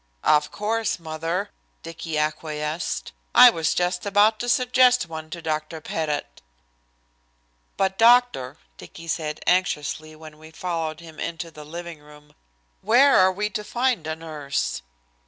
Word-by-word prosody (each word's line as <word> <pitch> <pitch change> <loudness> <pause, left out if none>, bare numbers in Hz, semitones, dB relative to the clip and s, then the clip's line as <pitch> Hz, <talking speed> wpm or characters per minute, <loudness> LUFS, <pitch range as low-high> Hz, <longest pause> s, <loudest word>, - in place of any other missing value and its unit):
"Of 150 -1 +3
course, 220 +1 -1
mother," 165 +4 -4 0.3
Dicky 165 -1 -5
acquiesced. 150 +1 -3 0.2
"I 250 0 +10
was 165 -6 -1
just 180 0 0
about 210 +2 +3
to 245 - -3
suggest 250 - +4
one 160 -1 -8
to 170 +1 -8
Dr. 155 0 -3
Pettit." 150 -2 -4 1.4
"But, 190 0 0
doctor," 235 - +4 0.2
Dicky 165 - -11
said 155 -2 -3
anxiously 155 -3 0
when 155 -1 -13
we 155 0 -13
followed 160 -1 -4
him 160 -2 -13
into 165 0 -5
the 150 -1 -11
living 170 +1 -8
room, 150 0 -18 0.5
"where 250 +7 +5
are 185 0 +5
we 210 +3 -3
to 210 - -4
find 240 -7 -1
a 160 - -2
nurse?" 150 - -3
165 Hz, 135 wpm, -24 LUFS, 155-205 Hz, 1.4 s, I